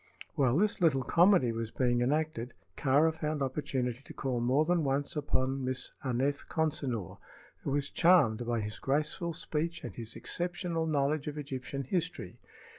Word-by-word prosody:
While 130 -1 +2
this 205 +1 +1
little 140 -6 +3
comedy 170 - +4
was 115 -1 -3
being 120 0 +1
enacted, 135 -2 -1 0.2
Kāra 145 +4 +3
found 155 -2 -2
opportunity 130 -3 -2
to - - -11
call 130 -3 -1
more 130 +6 +3
than 175 -1 +2
once 140 +2 0
upon 135 -2 0
Miss 130 0 -2
Aneth 135 +2 0
Consinor, 140 - -2 0.4
who - - -3
was 145 +1 -1
charmed 155 -11 +4
by 120 -2 0
his 105 0 -5
graceful 150 +4 -1
speech 165 0 -3
and 120 - -6
his 115 -1 -6
exceptional 175 -2 -2
knowledge 145 0 +1
of 150 0 -4
Egyptian 140 -1 -4
history. 170 +6 -3
140 Hz, 155 wpm, -31 LUFS, 125-160 Hz, 0.4 s, comedy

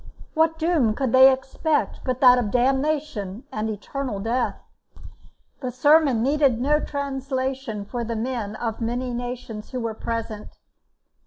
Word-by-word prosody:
What 320 0 +2
doom 315 -10 +2
could 265 -3 -1
they 260 +1 +8
expect 265 +4 -1
but 255 +1 -2
that 250 -1 +7
of 225 -4 -1
damnation 265 -4 0
and 215 +1 -2
eternal 220 +2 -4
death? 235 +4 -1 1.0
The 255 - -3
sermon 275 -1 +4
needed 275 -3 +2
no 295 +4 +2
translation 265 -6 -3
for 240 +3 -4
the 230 0 -3
men 225 -2 -3
of 225 0 -4
many 245 +2 -2
nations 240 -3 -6
who 255 - -4
were 230 -2 -2
present. 225 -1 -5
255 Hz, 140 wpm, -24 LUFS, 225-275 Hz, 1.0 s, they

